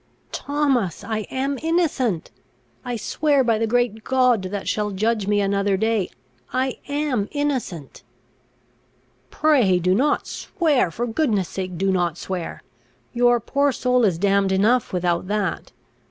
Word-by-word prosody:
"Thomas, 275 - 0
I 215 -2 -3
am 270 +1 -2
innocent! 300 - 0 0.5
I 245 -1 -3
swear 280 +5 +1
by 230 -3 +1
the 225 - +1
great 230 -2 0
God 255 -4 +3
that 195 +1 -4
shall 210 -1 0
judge 210 +1 0
me 205 0 +2
another 200 0 +1
day, 220 -2 0 0.4
I 260 0 -1
am 285 -8 -1
innocent!" 260 - -3 1.3
"Pray, 255 -12 +3
do 180 +1 +2
not 280 +9 +1
swear! 310 - 0
for 235 +8 -3
goodness' 225 - 0
sake, 185 -2 -5
do 195 +2 +1
not 175 -3 0
swear! 180 -3 -5 0.5
your 240 0 +4
poor 280 +5 +1
soul 250 0 +1
is 190 -6 +2
damned 195 +1 +2
enough 215 +6 +2
without 175 -1 0
that. 205 -4 -2
225 Hz, 140 wpm, -22 LUFS, 195-260 Hz, 1.3 s, your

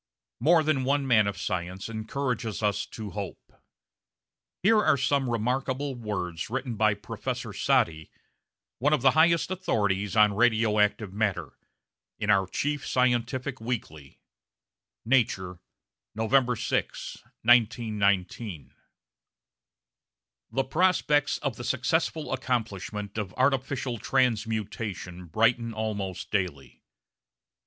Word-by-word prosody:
More 165 +1 +4
than 150 -4 +1
one 140 +1 +1
man 110 -5 +4
of 100 - -3
science 95 0 -3
encourages 115 0 -3
us 100 -1 0
to 110 -3 -7
hope. 100 -2 -7 1.1
Here 215 +2 +5
are - - +4
some 135 0 +1
remarkable 130 +4 -1
words 100 -8 -4
written 130 0 -3
by 110 -1 +3
Professor 100 - -5
Soddy, 80 -1 +1 0.7
one 145 +5 +2
of 130 - +1
the 130 - +6
highest 165 +3 +3
authorities 105 - 0
on 105 -1 +5
radio 110 -1 +3
active 105 -1 +1
matter, 105 -2 -1 0.6
in 105 -1 +1
our 95 -2 +3
chief 145 +8 -2
scientific 125 +1 0
weekly 80 - -5 0.9
(Nature, 95 -8 +1 0.6
November 125 +3 +2
6, - - -2 0.3
1919): 105 - +1 1.8
The 135 - 0
prospects 150 -1 +2
of 135 -6 -2
the 120 - -6
successful 155 +4 0
accomplishment 110 -5 -3
of 95 -3 -5
artificial 130 -2 0
transmutation 110 -7 -1
brighten 115 +5 +1
almost 105 -4 -4
daily. 90 -9 -3
115 Hz, 105 wpm, -27 LUFS, 100-130 Hz, 1.8 s, the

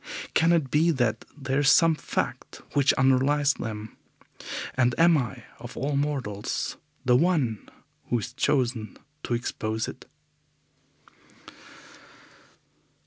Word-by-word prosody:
Can 165 +1 +4
it 160 -6 +1
be 160 +3 +3
that 120 -8 0
there 135 -1 -1
is 145 -1 +4
some 165 +1 +6
fact 155 - -4
which 140 -1 +4
underlies 135 +2 +3
them, 110 -1 -6 0.8
and 120 -2 +2
am 165 0 +6
I, 125 -9 -2 0.2
of - - -10
all 140 +2 -1
mortals, 135 -7 -2 0.3
the 125 -1 +5
one 135 - +1 0.4
who 120 - +2
is 115 +2 -5
chosen 125 -5 0 0.2
to 120 - -1
expose 110 -2 -3
it? - - -9
130 Hz, 115 wpm, -26 LUFS, 120-145 Hz, 0.8 s, some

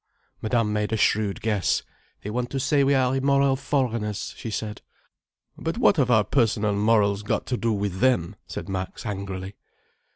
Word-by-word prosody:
Madame 110 -1 +1
made 105 0 -1
a 110 - +1
shrewd 105 -1 +1
guess. 105 -5 +1 0.4
"They 105 - -4
want 125 +2 -2
to 135 - -2
say 140 +1 +2
we 140 +1 +3
are 130 0 +2
immoral 140 0 +3
foreigners," 120 -6 -2
she 115 - -6
said. 105 0 -4 0.8
"But 165 +6 -3
what 220 -6 +4
have 135 -4 +2
our 110 -3 +5
personal 105 -2 +1
morals 100 -1 +2
got 105 - -1
to 125 - -1
do 115 -1 0
with 100 -3 -2
them?" 110 -7 +2
said - - -6
Max 95 -1 -5
angrily. 95 -2 -5
110 Hz, 170 wpm, -25 LUFS, 105-130 Hz, 0.8 s, our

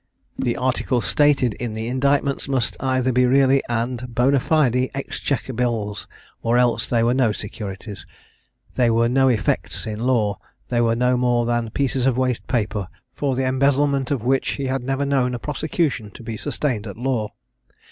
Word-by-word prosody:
The 120 - 0
articles 125 -3 0
stated 140 -1 +3
in 120 0 -5
the 110 +1 -4
indictments 140 +3 0
must 130 -4 0
either 130 -1 +1
be 125 0 +3
really 135 +1 +4
and 120 +1 -1
bonâ 125 +2 +1
fide 130 -5 +2
exchequer 135 -1 -3
bills, 110 -4 -2 0.3
or 115 +1 +2
else 125 -1 +2
they 115 -2 +2
were 120 +1 +3
no 125 -4 +2
securities; 100 -3 -7 0.7
they 125 -2 +2
were 115 +1 +3
no 135 +2 +3
effects 115 -5 0
in 110 -1 -4
law; 115 -4 +1 0.3
they 120 -1 +1
were 115 -1 +2
no 125 +1 +2
more 120 -1 +2
than 120 -1 0
pieces 135 +1 0
of 130 -2 +1
waste 130 -2 -1
paper, 105 -5 -1 0.3
for 140 -3 -1
the 130 +1 0
embezzlement 140 0 +2
of 135 -6 -1
which 130 +2 +1
he 140 - -4
had 130 0 -1
never 135 +2 -1
known 130 -3 +1
a - - -2
prosecution 150 - -2
to - - -10
be 115 -1 -5
sustained 115 -2 -2
at 100 - -8
law. 120 -4 -1
125 Hz, 175 wpm, -22 LUFS, 115-135 Hz, 0.7 s, really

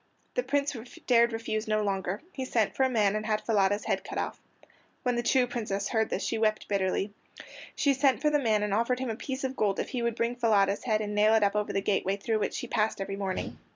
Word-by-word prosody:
The - - +1
Prince 285 - 0 0.3
dared 235 -1 +4
refuse 225 -1 -3
no 215 0 +1
longer. 195 - -2
He 265 - -4
sent 230 -5 0
for - - -2
a 260 - +4
man 210 -4 +2
and 215 - -2
had 215 -1 +1
Falada's 205 -2 +2
head - - 0
cut - - -6
off. - - -3 0.6
When 250 -1 +1
the 240 - +1
true 250 +1 +3
Princess 210 -5 -3
heard 220 -2 +1
this - - -2
she 225 - -1
wept 215 -1 +1
bitterly. 195 0 0 0.6
She 280 - +3
sent 270 -1 +2
for 300 +2 +2
the 295 - +3
man 215 -5 +2
and 210 -1 -1
offered 235 +4 +1
him 255 -2 -2
a - - -3
piece 265 +3 -5
of 265 0 -2
gold 200 -4 0
if - - -2
he 250 - -3
would 235 -1 0
bring 235 +1 -1
Falada's 205 -4 +2
head 215 -3 +1
and 210 -1 -3
nail 210 +1 +4
it 220 - +4
up 200 0 +2
over 210 0 0
the 195 - 0
gateway 195 -1 0
through 215 +2 -1
which - - -2
she - - -3
passed 220 -3 0
every 195 0 -3
morning. 195 -2 -4
220 Hz, 250 wpm, -29 LUFS, 205-245 Hz, 0.6 s, dared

